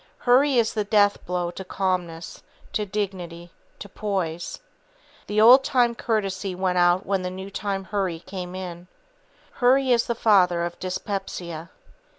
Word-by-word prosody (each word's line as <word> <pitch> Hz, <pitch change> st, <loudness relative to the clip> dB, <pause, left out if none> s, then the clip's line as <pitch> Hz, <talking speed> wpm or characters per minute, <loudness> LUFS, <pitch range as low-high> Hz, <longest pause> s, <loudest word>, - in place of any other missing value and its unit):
Hurry 260 Hz, +2 st, +3 dB
is 225 Hz, -1 st, +2 dB
the 215 Hz, -, 0 dB
deathblow 200 Hz, -4 st, +1 dB
to 190 Hz, -, -7 dB
calmness, 180 Hz, -3 st, -3 dB, 0.3 s
to 210 Hz, -1 st, -1 dB
dignity, 180 Hz, -4 st, -5 dB, 0.3 s
to -, -, -9 dB
poise. 185 Hz, -5 st, -3 dB, 0.7 s
The 210 Hz, +1 st, 0 dB
old 250 Hz, +5 st, +8 dB
time 245 Hz, -3 st, +2 dB
courtesy 195 Hz, -5 st, -2 dB
went 180 Hz, -1 st, 0 dB
out 175 Hz, +2 st, +3 dB
when 195 Hz, -1 st, 0 dB
the 180 Hz, -, -3 dB
new 190 Hz, +2 st, -8 dB
time 195 Hz, -1 st, -3 dB
hurry 190 Hz, -4 st, -2 dB
came 185 Hz, -1 st, -7 dB
in. 180 Hz, -1 st, -7 dB, 0.6 s
Hurry 260 Hz, +1 st, +3 dB
is 235 Hz, -1 st, +3 dB
the 235 Hz, -, -1 dB
father 180 Hz, -6 st, +3 dB
of 175 Hz, -, -7 dB
dyspepsia. 180 Hz, -3 st, -5 dB
190 Hz, 145 wpm, -24 LUFS, 180-215 Hz, 0.7 s, old